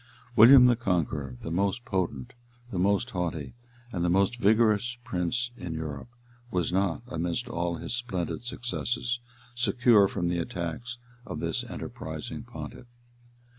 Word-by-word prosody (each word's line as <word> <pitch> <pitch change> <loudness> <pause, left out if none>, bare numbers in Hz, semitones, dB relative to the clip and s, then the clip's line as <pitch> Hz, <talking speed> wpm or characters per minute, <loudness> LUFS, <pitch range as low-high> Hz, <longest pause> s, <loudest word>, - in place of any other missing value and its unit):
[] 125 -1 -26
William 125 +4 +10
the 125 -1 +6
Conqueror, 80 - -1
the 80 - -4
most 100 +7 0
potent, 85 - -2 0.4
the 95 - -2
most 100 +6 +2
haughty, 85 -6 -3 0.4
and 85 -4 -2
the 90 - +2
most 100 +7 +2
vigorous 110 +3 +3
prince 110 +7 -1
in 85 -7 -5
Europe, 75 0 -5 0.4
was 90 -4 0
not, 95 +2 +1
amidst 90 +5 -2
all 85 -6 -1
his 100 - -5
splendid 120 -4 -3
successes, 120 0 -2 0.3
secure 120 -4 +4
from 90 -3 -2
the 85 0 0
attacks 85 +8 -4 0.3
of - - -6
this - - -1
enterprising - - -6
pontiff. 120 - -9
100 Hz, 140 wpm, -28 LUFS, 85-120 Hz, 0.4 s, William